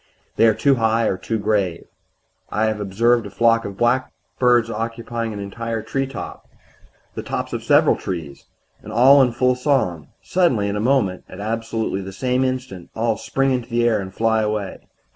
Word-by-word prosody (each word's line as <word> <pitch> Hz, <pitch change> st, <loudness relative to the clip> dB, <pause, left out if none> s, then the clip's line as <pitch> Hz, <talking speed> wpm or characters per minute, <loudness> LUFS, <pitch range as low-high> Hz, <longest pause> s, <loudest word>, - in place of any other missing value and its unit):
They 115 Hz, -, +5 dB
are 110 Hz, -, +3 dB
too 140 Hz, -2 st, +3 dB
high 115 Hz, 0 st, +2 dB
or 95 Hz, -, +1 dB
too 110 Hz, +4 st, -3 dB
grave. 100 Hz, -5 st, -1 dB, 0.6 s
I 110 Hz, -, 0 dB
have 110 Hz, -1 st, -1 dB
observed 115 Hz, +4 st, +1 dB
a -, -, -9 dB
flock 115 Hz, 0 st, +2 dB
of 100 Hz, -1 st, -7 dB
blackbirds 120 Hz, -1 st, +1 dB
occupying 115 Hz, +1 st, -4 dB
an 105 Hz, -, -6 dB
entire 115 Hz, +3 st, -4 dB
treetop 135 Hz, 0 st, -5 dB, 0.6 s
the -, -, -5 dB
tops -, -, -4 dB
of -, -, -3 dB
several -, -, +4 dB
trees 80 Hz, -7 st, -6 dB, 0.4 s
and -, -, -10 dB
all 135 Hz, +4 st, +6 dB
in 125 Hz, -2 st, +3 dB
full 125 Hz, +2 st, +2 dB
song. 125 Hz, -, 0 dB, 0.2 s
Suddenly 130 Hz, -, +1 dB
in 100 Hz, -, -2 dB
a -, -, -1 dB
moment 110 Hz, -6 st, +1 dB
at 95 Hz, -, -10 dB
absolutely 110 Hz, -1 st, -2 dB
the 95 Hz, 0 st, -7 dB
same 125 Hz, +4 st, 0 dB
instant 130 Hz, -9 st, -4 dB
all 115 Hz, 0 st, 0 dB
spring 135 Hz, +5 st, -1 dB
into 125 Hz, -2 st, -2 dB
the 120 Hz, 0 st, +2 dB
air 110 Hz, -3 st, +2 dB
and 95 Hz, -1 st, -7 dB
fly 110 Hz, +2 st, +1 dB
away. 105 Hz, -2 st, -3 dB
115 Hz, 180 wpm, -21 LUFS, 105-125 Hz, 0.6 s, all